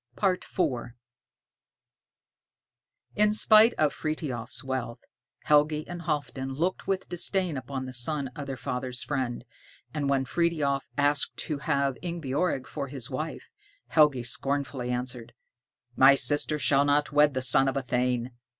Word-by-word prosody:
IV 190 Hz, -1 st, -1 dB, 2.6 s
In 210 Hz, 0 st, +3 dB
spite 220 Hz, +2 st, +6 dB
of 150 Hz, -2 st, +2 dB
Frithiof's 145 Hz, -5 st, -4 dB
wealth, 130 Hz, -3 st, -3 dB, 0.5 s
Helgi 150 Hz, +1 st, +3 dB
and 175 Hz, 0 st, -6 dB
Halfdan 135 Hz, -4 st, -3 dB
looked 175 Hz, +6 st, -2 dB
with 195 Hz, -1 st, -1 dB
disdain 180 Hz, -1 st, 0 dB
upon 130 Hz, 0 st, -5 dB
the 130 Hz, -, -8 dB
son 135 Hz, +2 st, -2 dB
of 140 Hz, +2 st, -8 dB
their 135 Hz, -1 st, -4 dB
father's 125 Hz, 0 st, -4 dB
friend; 130 Hz, -4 st, -3 dB, 0.5 s
and 145 Hz, -3 st, -1 dB
when 135 Hz, -1 st, +1 dB
Frithiof 150 Hz, -3 st, 0 dB
asked 145 Hz, 0 st, +1 dB
to 150 Hz, -3 st, -4 dB
have 140 Hz, -3 st, 0 dB
Ingebjorg 165 Hz, -4 st, -2 dB
for 140 Hz, -, -5 dB
his 135 Hz, -1 st, -7 dB
wife, 155 Hz, +4 st, -5 dB, 0.4 s
Helgi 150 Hz, -6 st, +4 dB
scornfully 135 Hz, 0 st, -2 dB
answered, 125 Hz, -1 st, -4 dB, 0.6 s
"My 135 Hz, +1 st, +7 dB
sister 145 Hz, +3 st, +2 dB
shall 140 Hz, -1 st, +3 dB
not 145 Hz, +1 st, +1 dB
wed 145 Hz, -1 st, +4 dB
the 130 Hz, -, -1 dB
son 135 Hz, +1 st, +5 dB
of 135 Hz, -, 0 dB
a 135 Hz, -, -1 dB
thane. 125 Hz, 0 st, -1 dB
140 Hz, 135 wpm, -27 LUFS, 130-155 Hz, 2.6 s, My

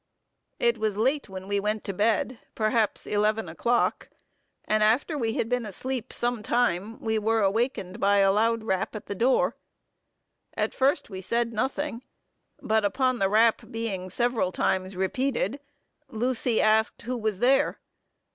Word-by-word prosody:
"It 235 Hz, -1 st, +2 dB
was 215 Hz, -2 st, -1 dB
late 265 Hz, +3 st, +1 dB
when 190 Hz, 0 st, -8 dB
we 200 Hz, 0 st, 0 dB
went 210 Hz, +1 st, -2 dB
to 195 Hz, -, -3 dB
bed, 225 Hz, +4 st, 0 dB, 0.2 s
perhaps 215 Hz, 0 st, 0 dB
eleven 210 Hz, 0 st, 0 dB
o'clock; 235 Hz, +9 st, 0 dB, 0.6 s
and 215 Hz, 0 st, +1 dB
after 235 Hz, +9 st, +2 dB
we 230 Hz, -6 st, -1 dB
had 225 Hz, -, -1 dB
been 250 Hz, 0 st, 0 dB
asleep 245 Hz, +4 st, -5 dB
some 240 Hz, -2 st, -1 dB
time, 225 Hz, -2 st, 0 dB
we 220 Hz, -1 st, 0 dB
were 225 Hz, +1 st, +1 dB
awakened 205 Hz, -1 st, 0 dB
by 200 Hz, -1 st, +3 dB
a 195 Hz, -1 st, +5 dB
loud 225 Hz, +2 st, +1 dB
rap 190 Hz, 0 st, -1 dB
at 215 Hz, -, -7 dB
the -, -, -4 dB
door. 245 Hz, +6 st, +2 dB, 1.0 s
At -, -, 0 dB
first 280 Hz, -1 st, +1 dB
we 190 Hz, -1 st, -6 dB
said 235 Hz, +4 st, -1 dB
nothing; 265 Hz, +2 st, -2 dB, 0.6 s
but 220 Hz, 0 st, +2 dB
upon 255 Hz, +4 st, +1 dB
the 195 Hz, -, +2 dB
rap 220 Hz, +2 st, +4 dB
being 205 Hz, -5 st, -4 dB
several 235 Hz, -1 st, 0 dB
times 185 Hz, +1 st, -1 dB
repeated, 250 Hz, +5 st, -1 dB, 0.5 s
Lucy 245 Hz, -1 st, 0 dB
asked 220 Hz, +1 st, +2 dB
who 250 Hz, +2 st, -3 dB
was 215 Hz, -4 st, -2 dB
there. 260 Hz, +6 st, +3 dB
220 Hz, 155 wpm, -26 LUFS, 205-240 Hz, 1.0 s, a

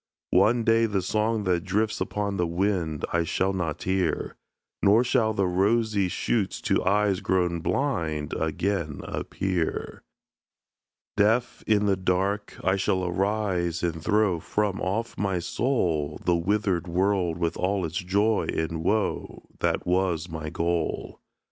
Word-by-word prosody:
One 110 Hz, +6 st, +4 dB
day 115 Hz, 0 st, +4 dB
the 100 Hz, -3 st, -1 dB
song 110 Hz, +3 st, 0 dB
that 90 Hz, -3 st, +1 dB
drifts 105 Hz, +3 st, 0 dB
upon 100 Hz, -1 st, -2 dB
the 90 Hz, -, +1 dB
wind, 85 Hz, -3 st, -1 dB
I 85 Hz, 0 st, +2 dB
shall 95 Hz, +4 st, 0 dB
not 85 Hz, -5 st, -3 dB
hear; 95 Hz, -1 st, -1 dB, 0.5 s
Nor 105 Hz, +4 st, +5 dB
shall 120 Hz, -3 st, +2 dB
the 100 Hz, -3 st, 0 dB
rosy 100 Hz, +2 st, +2 dB
shoots 100 Hz, +2 st, -1 dB
to -, -, +1 dB
eyes 100 Hz, 0 st, +2 dB
grown 90 Hz, -2 st, 0 dB
blind 80 Hz, -, -1 dB
Again 80 Hz, -1 st, -1 dB
appear. 90 Hz, -4 st, -3 dB, 1.2 s
Deaf, 115 Hz, +4 st, +2 dB
in 105 Hz, -1 st, +3 dB
the 100 Hz, -1 st, +3 dB
dark, 95 Hz, +3 st, -1 dB
I 95 Hz, +1 st, +2 dB
shall 95 Hz, -1 st, 0 dB
arise 90 Hz, -2 st, -1 dB
and 80 Hz, -2 st, -2 dB
throw 105 Hz, -4 st, +2 dB
From 100 Hz, +3 st, -1 dB
off 110 Hz, +5 st, -2 dB
my 95 Hz, -2 st, 0 dB
soul, 85 Hz, -, 0 dB
The 90 Hz, -, +3 dB
withered 90 Hz, 0 st, 0 dB
world 90 Hz, -1 st, +1 dB
with 85 Hz, -1 st, -1 dB
all 95 Hz, 0 st, 0 dB
its 80 Hz, +1 st, -4 dB
joy 100 Hz, +4 st, +1 dB
and 80 Hz, 0 st, -2 dB
woe, 105 Hz, +4 st, -1 dB, 0.2 s
That -, -, 0 dB
was 90 Hz, -2 st, +1 dB
my 80 Hz, -2 st, -5 dB
goal. 85 Hz, +1 st, -2 dB
95 Hz, 140 wpm, -26 LUFS, 85-105 Hz, 1.2 s, Nor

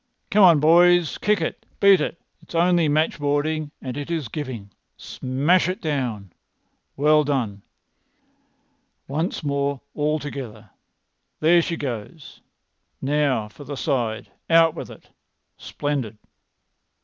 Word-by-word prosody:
"Come 210 Hz, -2 st, +5 dB
on, 170 Hz, -5 st, +7 dB
boys! 175 Hz, +2 st, +4 dB
Kick 210 Hz, -3 st, +1 dB
it! 160 Hz, -, -4 dB, 0.2 s
Beat 195 Hz, -4 st, +6 dB
it! 155 Hz, +2 st, -3 dB, 0.2 s
It's -, -, -12 dB
only 170 Hz, -2 st, +3 dB
matchboarding, 150 Hz, 0 st, 0 dB
and 130 Hz, -2 st, -5 dB
it 145 Hz, +1 st, -6 dB
is 160 Hz, -8 st, -3 dB
giving. 120 Hz, -8 st, -6 dB, 0.3 s
Smash 145 Hz, +8 st, 0 dB
it 185 Hz, +3 st, -3 dB
down! 125 Hz, -, -3 dB, 0.6 s
Well 150 Hz, +2 st, +4 dB
done! 120 Hz, -9 st, -2 dB, 1.5 s
Once 155 Hz, +5 st, -3 dB
more 140 Hz, -1 st, -1 dB
all 150 Hz, +1 st, 0 dB
together! 120 Hz, -8 st, -8 dB, 0.7 s
There 170 Hz, +2 st, +5 dB
she 165 Hz, 0 st, -3 dB
goes! 130 Hz, +3 st, -7 dB, 0.6 s
Now 140 Hz, -5 st, 0 dB
for 125 Hz, +7 st, -13 dB
the 140 Hz, 0 st, -7 dB
side! 120 Hz, -7 st, -2 dB, 0.2 s
Out 165 Hz, -1 st, +5 dB
with -, -, -7 dB
it! -, -, -14 dB, 0.5 s
Splendid!" 135 Hz, -7 st, -4 dB
145 Hz, 120 wpm, -23 LUFS, 130-165 Hz, 1.5 s, on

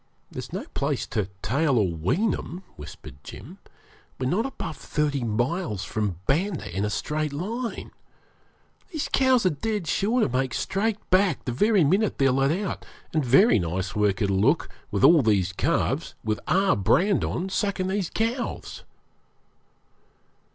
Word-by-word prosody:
'There's -, -, -7 dB
no -, -, -4 dB
place -, -, -1 dB
to 100 Hz, -2 st, -2 dB
tail 140 Hz, 0 st, +2 dB
or 105 Hz, -4 st, +3 dB
wean 130 Hz, -, +1 dB
'em,' 180 Hz, +3 st, -6 dB
whispered 70 Hz, -2 st, -11 dB
Jim. -, -, -11 dB, 0.6 s
'We're 130 Hz, +1 st, -1 dB
not 220 Hz, +8 st, +1 dB
above 160 Hz, -, -6 dB
thirty 145 Hz, -3 st, -1 dB
miles 120 Hz, -, -1 dB
from 105 Hz, -2 st, -2 dB
Banda 160 Hz, -, -1 dB
in 95 Hz, -, 0 dB
a 105 Hz, -, 0 dB
straight 150 Hz, +7 st, -2 dB
line. 225 Hz, -, -4 dB, 1.0 s
These 315 Hz, -6 st, -3 dB
cows 260 Hz, -4 st, +4 dB
are 185 Hz, -, +4 dB
dead 205 Hz, +6 st, -2 dB
sure 220 Hz, +9 st, +1 dB
to -, -, +3 dB
make 130 Hz, 0 st, -1 dB
straight 210 Hz, +2 st, 0 dB
back 185 Hz, -4 st, +3 dB
the 125 Hz, -, -1 dB
very 205 Hz, -, +3 dB
minute 195 Hz, +8 st, +2 dB
they're 135 Hz, -2 st, +3 dB
let 135 Hz, +1 st, +2 dB
out, 185 Hz, +5 st, -2 dB, 0.3 s
and 155 Hz, -2 st, +1 dB
very 135 Hz, -, +5 dB
nice 90 Hz, +3 st, -3 dB
work 105 Hz, 0 st, +1 dB
it'll 100 Hz, -1 st, +1 dB
look 140 Hz, -, +2 dB, 0.2 s
with 100 Hz, -2 st, -1 dB
all 165 Hz, -2 st, +7 dB
these 100 Hz, -5 st, +2 dB
calves -, -, 0 dB
with 110 Hz, -1 st, -1 dB
our 195 Hz, +1 st, +3 dB
brand 175 Hz, -, +2 dB
on 185 Hz, +3 st, -2 dB
sucking 190 Hz, -1 st, -1 dB
these 190 Hz, -3 st, -1 dB
cows.' 230 Hz, +3 st, -3 dB
150 Hz, 155 wpm, -25 LUFS, -, 1.0 s, all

